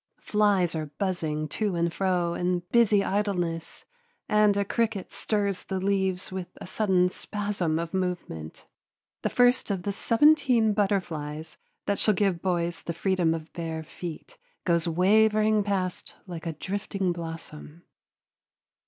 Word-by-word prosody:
Flies 205 Hz, -5 st, +2 dB
are 155 Hz, -2 st, -3 dB
buzzing 155 Hz, -2 st, -2 dB
to 205 Hz, +3 st, -1 dB
and 170 Hz, 0 st, 0 dB
fro 180 Hz, -3 st, +1 dB
in 180 Hz, 0 st, 0 dB
busy 215 Hz, -4 st, +5 dB
idleness, 180 Hz, -6 st, -2 dB, 0.4 s
and 210 Hz, -1 st, +4 dB
a 200 Hz, -, +1 dB
cricket 220 Hz, -3 st, -1 dB
stirs 200 Hz, -3 st, -1 dB
the 190 Hz, -1 st, -2 dB
leaves 190 Hz, -1 st, 0 dB
with 185 Hz, -1 st, -4 dB
a -, -, -7 dB
sudden 185 Hz, -2 st, +2 dB
spasm 200 Hz, -4 st, -2 dB
of 170 Hz, +1 st, -4 dB
movement. 180 Hz, -, -4 dB, 0.6 s
The -, -, 0 dB
first 245 Hz, -1 st, +3 dB
of 190 Hz, -3 st, -2 dB
the 200 Hz, -, -2 dB
seventeen 235 Hz, -1 st, +4 dB
butterflies 160 Hz, -7 st, -2 dB, 0.3 s
that 200 Hz, -, 0 dB
shall 215 Hz, -, +3 dB
give 185 Hz, -3 st, +1 dB
boys 175 Hz, -2 st, -1 dB
the 170 Hz, -, -4 dB
freedom 175 Hz, -1 st, +1 dB
of 160 Hz, -1 st, -8 dB
bare 165 Hz, -2 st, -4 dB
feet 165 Hz, +1 st, -8 dB, 0.3 s
goes 170 Hz, -1 st, +2 dB
wavering 215 Hz, +4 st, +4 dB
past 190 Hz, -3 st, -2 dB
like 170 Hz, -3 st, -7 dB
a 165 Hz, -, -2 dB
drifting 195 Hz, +2 st, -2 dB
blossom. 165 Hz, -1 st, -8 dB
185 Hz, 135 wpm, -27 LUFS, 170-205 Hz, 0.6 s, busy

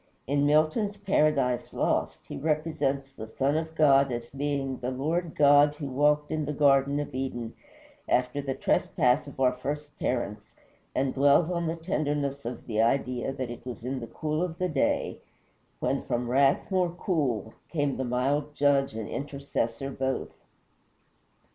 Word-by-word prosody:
In 145 Hz, +2 st, +2 dB
Milton's 155 Hz, +8 st, +2 dB
"Paradise 150 Hz, -11 st, +1 dB
Lost" -, -, 0 dB
he -, -, -6 dB
represents 150 Hz, -2 st, -1 dB
the 110 Hz, -4 st, -8 dB
Son 135 Hz, +6 st, 0 dB
of 160 Hz, 0 st, -2 dB
God 140 Hz, -3 st, +5 dB
as 120 Hz, 0 st, -5 dB
being 140 Hz, -1 st, -2 dB
"the 125 Hz, -, -2 dB
Lord 155 Hz, +6 st, -2 dB
God 145 Hz, 0 st, +6 dB
who 150 Hz, -, -6 dB
walked 150 Hz, +2 st, +2 dB
in 155 Hz, -1 st, -1 dB
the 150 Hz, -, -2 dB
Garden 140 Hz, 0 st, +3 dB
of 145 Hz, -, -4 dB
Eden" 125 Hz, -3 st, -4 dB, 0.6 s
after 125 Hz, +3 st, +1 dB
the 135 Hz, -1 st, -3 dB
trespass 125 Hz, +3 st, +1 dB
of 140 Hz, -, -11 dB
our 130 Hz, -1 st, +4 dB
first 145 Hz, +3 st, -5 dB
parents, 105 Hz, -4 st, -3 dB, 0.4 s
and 130 Hz, 0 st, +1 dB
dwells 145 Hz, +5 st, +4 dB
on 170 Hz, -1 st, -1 dB
the 165 Hz, -, -1 dB
tenderness 145 Hz, -5 st, -2 dB
of 120 Hz, -1 st, -6 dB
the 110 Hz, -2 st, 0 dB
idea 125 Hz, +1 st, +1 dB
that 130 Hz, -3 st, -4 dB
it 120 Hz, -, -9 dB
was 120 Hz, -3 st, -7 dB
in 130 Hz, +2 st, -3 dB
the 115 Hz, -, -7 dB
cool 155 Hz, +4 st, -2 dB
of 175 Hz, -2 st, -2 dB
the 185 Hz, 0 st, -1 dB
day, 145 Hz, -4 st, 0 dB, 0.6 s
"when -, -, 0 dB
from 120 Hz, 0 st, -2 dB
wrath 135 Hz, +7 st, +3 dB
more 185 Hz, -2 st, +2 dB
cool 145 Hz, -, -1 dB, 0.2 s
Came 145 Hz, -4 st, -1 dB
the 130 Hz, -, -1 dB
mild 140 Hz, +4 st, 0 dB
Judge 140 Hz, -4 st, +2 dB
and 110 Hz, -2 st, -4 dB
Intercessor 140 Hz, -2 st, -3 dB
both." 130 Hz, 0 st, -2 dB
140 Hz, 160 wpm, -28 LUFS, 130-150 Hz, 0.6 s, God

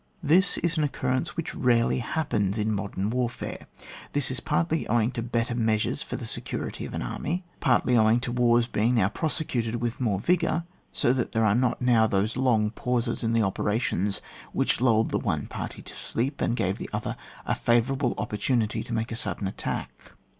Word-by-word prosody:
This 175 Hz, +6 st, +4 dB
is 170 Hz, -1 st, 0 dB
an 155 Hz, -, +2 dB
occurrence 130 Hz, -1 st, -1 dB
which 165 Hz, -, -3 dB
rarely 120 Hz, -1 st, +2 dB
happens 110 Hz, -7 st, -1 dB
in 110 Hz, 0 st, +1 dB
modem 100 Hz, 0 st, -2 dB
warfare. 125 Hz, -1 st, -3 dB, 0.5 s
This 145 Hz, -2 st, +2 dB
is 130 Hz, -, -1 dB
partly 160 Hz, +1 st, 0 dB
owing 115 Hz, +1 st, +2 dB
to 120 Hz, -, -3 dB
better 115 Hz, 0 st, -1 dB
measures 110 Hz, -2 st, +1 dB
for -, -, -5 dB
the -, -, -5 dB
security -, -, -4 dB
of -, -, -6 dB
an -, -, -2 dB
army; 165 Hz, -, -3 dB, 0.2 s
partly 125 Hz, -1 st, +3 dB
owing 110 Hz, +1 st, +5 dB
to 120 Hz, -, -3 dB
wars 120 Hz, -1 st, +3 dB
being 115 Hz, +1 st, +1 dB
now 100 Hz, -4 st, +3 dB
prosecuted 125 Hz, -5 st, -1 dB
with 120 Hz, +1 st, -3 dB
more 105 Hz, -6 st, +1 dB
vigour, 170 Hz, -, +1 dB, 0.3 s
so 120 Hz, -, +2 dB
that 125 Hz, -3 st, -2 dB
there 110 Hz, 0 st, +2 dB
are 100 Hz, -, +4 dB
not 125 Hz, +1 st, +1 dB
now 115 Hz, -3 st, +5 dB
those 105 Hz, +2 st, 0 dB
long 115 Hz, -5 st, +2 dB
pauses 120 Hz, 0 st, -1 dB
in 115 Hz, 0 st, 0 dB
the 115 Hz, -1 st, +3 dB
operations 100 Hz, 0 st, 0 dB, 0.3 s
which -, -, +1 dB
lulled 115 Hz, -3 st, +3 dB
the -, -, +1 dB
one -, -, -1 dB
party -, -, -6 dB
to -, -, -10 dB
sleep, 135 Hz, +5 st, -2 dB
and 120 Hz, -, +1 dB
gave 95 Hz, +1 st, 0 dB
the -, -, -6 dB
other -, -, -3 dB, 0.3 s
a -, -, +1 dB
favourable 125 Hz, +2 st, +1 dB
opportunity 110 Hz, +1 st, 0 dB
to 120 Hz, -, -6 dB
make 115 Hz, 0 st, -1 dB
a -, -, -2 dB
sud 115 Hz, -, -2 dB
den 100 Hz, -, -2 dB
attack. 95 Hz, -, -5 dB
120 Hz, 190 wpm, -27 LUFS, 110-130 Hz, 0.5 s, owing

